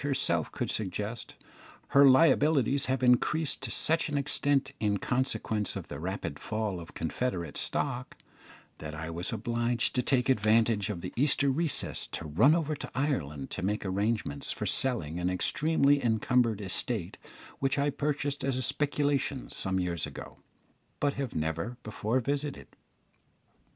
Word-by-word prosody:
herself 135 - 0
could - - -3
suggest, 105 +3 -4 0.5
her 140 - +6
liabilities 140 -1 +4
have 130 -1 -1
increased 135 +5 +2
to 135 - -4
such 160 +7 +1
an 145 - -1
extent 140 -1 +1
in 105 -2 +1
consequence 110 -3 -1
of - - -6
the 70 - -6
rapid 85 -4 -4
fall 110 -4 -3
of 85 - -11
Confederate 85 - -3
stock, 130 -2 -2 0.6
that 75 0 -7
I 80 +2 -5
was 85 +2 -4
obliged 120 +1 0
to 125 - +1
take 125 -1 +1
advantage 110 -3 +3
of 95 -5 -4
the - - -6
Easter 140 +1 +3
recess 155 +1 -1
to 85 - -6
run 110 - +5
over 155 -2 -1
to - - -7
Ireland 80 - -2
to - - -4
make 100 +3 -1
arrangements 100 -6 -1
for - - -4
selling 90 - +1
an 90 +1 0
extremely 145 - +3
encumbered 115 -1 +2
estate 100 -1 -2 0.4
which 135 +1 0
I 145 +1 +1
purchased 145 0 -2
as 135 -1 0
a 130 - -1
speculation 145 -1 0
some 95 0 -1
years 85 -3 -1
ago, - - -10 0.6
but 145 -1 +1
have 135 -3 -4
never 80 +9 -2
before 110 +3 -1
visited. 140 +3 -4
120 Hz, 150 wpm, -29 LUFS, 95-140 Hz, 0.6 s, her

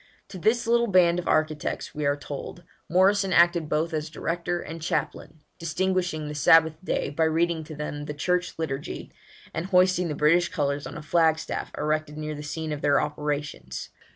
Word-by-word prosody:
To 190 -2 -8
this 235 +6 +2
little 235 +1 +3
band 180 -3 +4
of 180 - -6
architects, 155 -1 0
we 150 -1 -1
are 140 - +2
told, 145 +5 -7 0.3
Morrison 195 +2 +3
acted 170 -3 +4
both 160 +2 0
as 155 0 -2
director 175 +3 -2
and 165 0 -7
chaplain, 155 0 -3 0.2
distinguishing 175 -1 -1
the 150 - -5
Sabbath 160 +2 +5
day 165 - -1
by 160 +2 +1
reading 165 +1 +1
to 155 - -8
them 145 0 -5
the 150 - -5
Church 180 +3 0
Liturgy, 145 -3 -4 0.4
and 170 - -3
hoisting 185 -1 +3
the 150 - -3
British 170 +5 +3
colours 140 -3 -1
on - - -8
a - - -8
flagstaff 160 0 +1
erected 155 0 -1
near 155 0 -4
the 150 - -7
scene 155 +1 -4
of 150 -1 -4
their 140 -1 +3
operations. 150 0 -4
160 Hz, 180 wpm, -26 LUFS, 150-175 Hz, 0.4 s, Sabbath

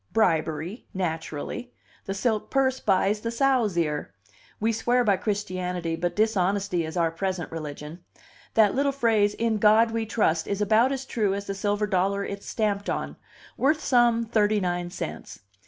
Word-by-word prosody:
Bribery, 165 - 0
naturally. 165 +6 -4 0.3
The 195 - -3
silk 215 +1 -1
purse 260 -1 +1
buys 200 +1 +2
the 230 - -2
sow's 235 -6 +1
ear. 150 -9 -1 0.4
We 225 +2 +1
swear 240 +3 +1
by 200 -4 +3
Christianity, 185 -4 -2
but 175 +1 -2
dishonesty 200 -4 +1
is 160 +2 -5
our 165 -1 +2
present 185 0 -3
religion. 155 +1 -7 0.5
That 215 -3 +5
little 280 +1 +1
phrase 220 -6 +2
'In 225 -2 0
God 220 +2 +5
We 225 -1 -2
Trust' 170 -7 +1
is 200 - -2
about 220 +5 +3
as 270 -1 -3
true 210 -6 0
as 200 0 -5
the 195 - -3
silver 205 +1 0
dollar 200 0 0
it's 200 0 -7
stamped 205 -2 -1
on - - -3 0.4
worth 300 +3 +2
some 240 -2 +3
thirty 215 -2 +2
nine 175 -2 -2
cents. 175 - -7
205 Hz, 160 wpm, -26 LUFS, 180-225 Hz, 0.5 s, That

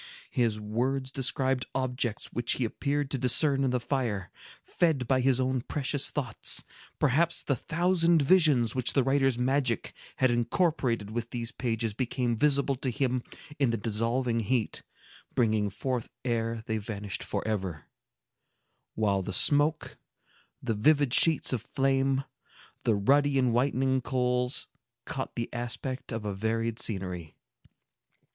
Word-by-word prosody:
His 115 -3 +1
words 130 +5 -1
described 130 -1 0
objects 125 -4 -2
which 120 0 0
he 125 - -1
appeared 140 +4 -2
to 135 - -1
discern 135 +3 +5
in 135 - +2
the 125 0 0
fire, 120 -7 -2 0.3
fed 155 -8 0
by 130 0 +2
his 130 0 +2
own 130 -1 0
precious 140 +1 0
thoughts; 125 -7 -2 0.3
perhaps 155 +4 +1
the 140 - 0
thousand 170 +4 +2
visions 145 -8 +4
which 125 -2 0
the 135 - +3
writer's 135 -1 +2
magic 130 -2 0 0.2
had 130 -1 +2
incorporated 120 - 0
with 115 +1 -3
these 120 -1 -4
pages 115 -4 -2
became 125 0 -1
visible 140 +2 +2
to 130 - -2
him 130 -1 0 0.4
in 135 -4 +3
the 115 - 0
dissolving 115 +3 0
heat, 115 +1 -1 0.5
brightening 110 -3 +2
forth 125 +4 -3 0.2
ere 115 -2 -1
they 110 -1 -1
vanished 100 -2 -5
forever; 95 -8 -3 1.1
while 100 -3 +1
the 95 - -5
smoke, 150 - +2 0.6
the 120 -3 0
vivid 140 +4 +3
sheets 160 -5 +4
of 120 - -1
flame, 135 +1 +1 0.6
the 115 - +3
ruddy 140 +7 +3
and 125 -3 +2
whitening 130 +1 +1
coals, 125 0 0 0.4
caught - - -5
the 115 - -2
aspect 120 +2 -5
of 110 -2 -4
a 105 - -2
varied 115 +3 -2
scenery. 90 -6 -4
125 Hz, 140 wpm, -28 LUFS, 115-135 Hz, 1.1 s, discern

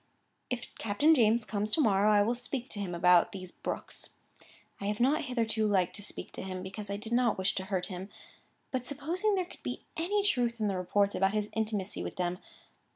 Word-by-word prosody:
"If 245 -2 -4
Captain 255 +10 +4
James 230 -4 +4
comes 210 0 -1
to - - +3
morrow, 210 -5 +4
I 205 -1 +6
will 230 +4 +1
speak 245 +1 -4
to 205 - -4
him 185 -3 -3
about 175 0 +5
these 185 -2 -7
Brookes. - - -6 0.6
I 200 - -5
have 210 0 -1
not 280 +5 +3
hitherto 230 -4 +1
liked 190 -4 +2
to - - -7
speak 205 - -4
to - - -7
him, 185 -1 -5
because 195 +2 -6
I 200 - -2
did 220 +2 -7
not 240 -2 +3
wish 190 +1 +1
to 190 - -3
hurt 190 -2 -1
him, 185 +1 -6 0.6
by 260 - +1
supposing 310 - -1
there 370 -2 0
could - - -15
be - - -5
any 400 +5 +1
truth 240 - +2
in 215 - +1
the 195 - -1
reports 200 +2 +1
about 195 +1 +2
his 210 0 0
intimacy 210 -3 -2
with - - -5
them. 180 -1 -1
210 Hz, 215 wpm, -31 LUFS, 195-245 Hz, 0.6 s, I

